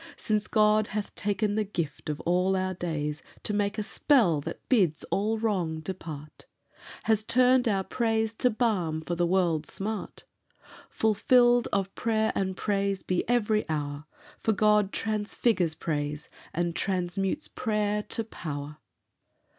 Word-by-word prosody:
Since 215 -1 0
God 215 -1 +3
hath 210 -1 -4
taken 205 0 0
the 215 +1 +1
gift 170 -8 -4
of 150 - -2
all 180 +2 +2
our 185 0 0
days 155 -4 -3 0.2
To 210 - -2
make 205 +1 0
a 215 - -1
spell 210 - +3
that - - -7
bids 185 - +2
all 215 +3 +1
wrong 185 -8 -1
depart, 155 -4 -8 0.6
Has 220 -1 +2
turned 250 +2 +4
our 195 -3 +1
praise 225 0 0
to 250 +3 +2
balm 200 -9 0
for 175 - -4
the 175 0 +1
world's 170 -4 +1
smart, 210 +2 -5 0.7
Fulfilled 240 +3 +4
of 195 -1 -1
prayer 220 -1 +1
and 190 -1 -2
praise 200 -2 0
be 180 -1 0
every 215 -3 +2
hour, 145 -1 -3 0.3
For 220 - +1
God 210 -1 +3
transfigures 210 -5 0
praise, 150 -1 -3 0.2
and 170 0 -1
transmutes 190 - -1
prayer, 210 -2 -1
to 225 - -2
power." 150 -8 -6
200 Hz, 140 wpm, -28 LUFS, 170-220 Hz, 0.7 s, turned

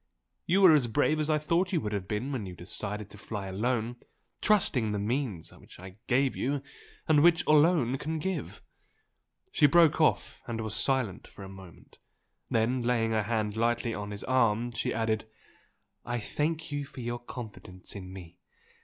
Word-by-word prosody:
You 190 +3 +3
were 185 -4 +9
as 140 -5 +4
brave 145 +6 +1
as 155 0 -1
I 155 - +3
thought 170 +5 0
you 175 - +2
would 100 -3 -3
be 105 0 -1
when 130 -4 -4
you 90 - -8
decided 100 +3 -5
to 105 - -12
fly 105 -3 -5
alone, 115 +4 -1 0.4
trusting 180 - +3
to - - -1
the - - -1
means 105 - -2 0.2
I 95 +1 -11
gave 130 +2 +2
you 140 +1 -1 0.4
and 150 -2 +5
which 170 +1 +4
I - - +5
alone 150 -5 +4
can 160 +1 -3
give!" 185 +4 -4 0.9
She 150 - +5
broke 165 +1 +5
off 155 - +1
and 115 -1 -3
was 110 -1 -3
silent 110 -2 0
for 100 - -12
a 95 - -8
moment, 95 -3 -14 0.5
then 115 +3 +1
laying 120 -2 +1
her 110 -1 +2
hand 105 -1 -1
lightly 115 +1 0
on 105 -1 -5
his 105 0 -6
arm, 120 -2 +2
she 115 - -2
added 110 -1 -1 0.8
"I 120 0 -2
thank 155 +7 -2
you 145 0 -2
for 135 -2 -9
your 120 0 -3
confidence 110 -7 -9
in 95 -2 -8
me! 90 -2 -11
120 Hz, 180 wpm, -29 LUFS, 105-145 Hz, 0.9 s, were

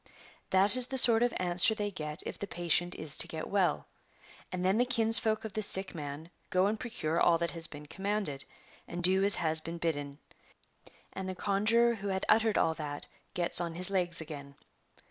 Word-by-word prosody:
That 195 +5 +4
is 250 -1 +8
the 265 - -5
sort 235 -3 +7
of 245 0 +1
answer 180 +4 +5
they 205 -1 -4
get 150 -4 -6
if - - -8
the 200 - -6
patient 175 0 -1
is 155 -1 -5
to - - +3
get 160 -1 -7
well. 195 -3 0 0.7
And 185 0 -4
then 195 +4 +1
the - - +4
kinsfolk 225 -3 +1
of 215 - -7
the 215 - -3
sick 190 -1 +2
man 150 +1 -8 0.2
go 185 +1 +1
and 215 +2 -2
procure 170 -10 -3
all 170 -1 +3
that 170 0 -3
has 165 -1 -1
been 150 0 -12
commanded, 190 -4 -2 0.4
and 175 +1 -7
do 190 +2 +4
as 200 0 +1
has 160 -2 -2
been 165 +2 -7
bidden, 145 -4 -4 1.0
and 190 0 -6
the 185 - -6
conjuror 220 +5 +1
who 205 -3 -7
had 190 -1 -3
uttered 220 0 +2
all 160 - +1
that 150 -2 -7 0.3
gets 175 0 +3
on 170 -1 -5
his 180 +2 -6
legs 175 -3 0
again. 140 -3 -10
185 Hz, 200 wpm, -29 LUFS, 165-210 Hz, 1.0 s, is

